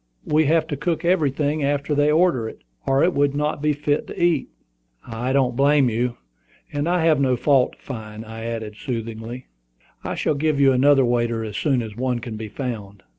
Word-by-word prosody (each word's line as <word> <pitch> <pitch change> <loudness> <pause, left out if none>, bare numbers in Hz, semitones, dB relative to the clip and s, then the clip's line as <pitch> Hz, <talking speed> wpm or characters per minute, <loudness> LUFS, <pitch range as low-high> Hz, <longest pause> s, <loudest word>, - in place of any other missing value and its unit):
We 155 +1 +3
have 160 +2 +3
to 145 - -2
cook 170 +4 -2
everything 150 -3 +1
after 140 +1 0
they 145 +1 +3
order 155 -9 +2
it, - - -14 0.2
or 135 0 +3
it 180 - +3
would 145 0 +1
not 150 0 -1
be 150 0 +2
fit 145 0 -1
to - - -8
eat." 170 -5 +2 0.6
"I 120 +3 -3
don't 130 -3 +2
blame 140 -1 +4
you, 120 +2 -1 0.6
and 145 +3 -1
I 175 -2 +2
have 155 -4 +4
no 130 -2 +3
fault 135 0 +2
to - - -21
find," 110 -3 -7
I 110 0 -8
added, 110 -2 -5
soothingly. 115 +1 -5 0.6
"I - - -3
shall - - 0
give 150 0 0
you 135 -1 +6
another 135 +1 +4
waiter 120 -1 0
as 105 -2 -6
soon 125 +3 +1
as 110 -2 -8
one 125 0 -1
can 115 -1 -6
be 110 0 -6
found." 105 -5 -6
135 Hz, 200 wpm, -22 LUFS, 115-150 Hz, 0.6 s, you